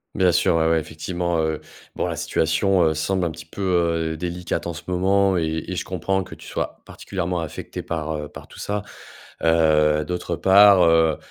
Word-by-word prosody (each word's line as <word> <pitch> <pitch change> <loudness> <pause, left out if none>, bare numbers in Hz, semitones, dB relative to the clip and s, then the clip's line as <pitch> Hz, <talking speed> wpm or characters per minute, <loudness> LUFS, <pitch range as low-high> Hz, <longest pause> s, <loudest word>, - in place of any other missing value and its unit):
Bien 90 -2 +3
sûr, 85 -1 +3
ouais 80 0 +2
ouais, 80 0 +3
effectivement, 85 +2 -3
heu, 80 -1 -1 0.3
bon, - - -1
la - - -3
situation, 85 +4 +1
heu, 80 -1 +3
semble 90 +4 -1
un 85 - -1
petit 80 - -10
peu, 90 +5 -9 0.5
heu, 80 - -5
délicate 90 0 -3
en 85 - -3
ce 75 - -8
moment 95 +1 +2
et 80 -1 -1
et 95 - -3
je - - -3
comprends 95 +1 -1
que 90 - -10
tu - - -15
sois - - -4
particulièrement 90 -2 -4
affecté 80 -2 -6
par, 80 -1 -4
heu, 75 - -5
par - - -12
tout - - -13
ça. 105 0 -2 0.6
Heu, 75 -2 +3
d'autre 90 -1 -3
part, 100 0 +6
heu, 80 -1 +4
85 Hz, 195 wpm, -22 LUFS, 80-90 Hz, 0.6 s, part